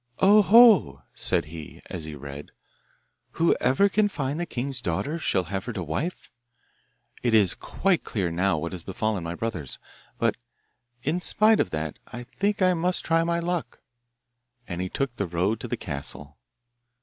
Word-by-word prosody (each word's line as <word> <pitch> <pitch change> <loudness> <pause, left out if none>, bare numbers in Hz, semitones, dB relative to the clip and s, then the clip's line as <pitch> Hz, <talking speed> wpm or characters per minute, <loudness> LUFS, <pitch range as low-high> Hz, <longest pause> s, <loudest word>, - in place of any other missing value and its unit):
'Oho!' 205 - +6
said - - +1
he, 80 -1 -10
as 80 -4 -5
he 80 -1 -7
read, 70 +1 -9 0.8
'whoever 165 +1 +3
can 210 +1 +2
find 145 -5 -3
the 175 - -2
king's 130 0 -3
daughter 140 - -2
shall 95 - +1
have 95 +2 -4
her 120 - -4
to 95 -5 -4
wife. 145 - -4 0.9
It 120 -2 +2
is 100 -5 +5
quite 195 -3 0
clear 95 -6 -2
now 90 0 +1
what 85 +2 -4
has 90 -2 -5
befallen 100 +1 -2
my 85 +1 -4
brothers. 90 - -3 0.4
But - - +1 0.7
in 160 +6 -1
spite 215 +4 +4
of - - +1
that 80 -2 -4
I 120 +1 -8
think 200 +9 -1
I 185 0 +4
must 180 +1 0
try 165 0 +3
my 170 0 0
luck,' 170 -1 -3 0.9
and 90 0 -4
he 95 - -3
took 135 +1 -2
the 100 - -1
road 90 +6 0
to - - -6
the - - -3
castle. 75 +1 -6
115 Hz, 165 wpm, -26 LUFS, -, 0.9 s, Oho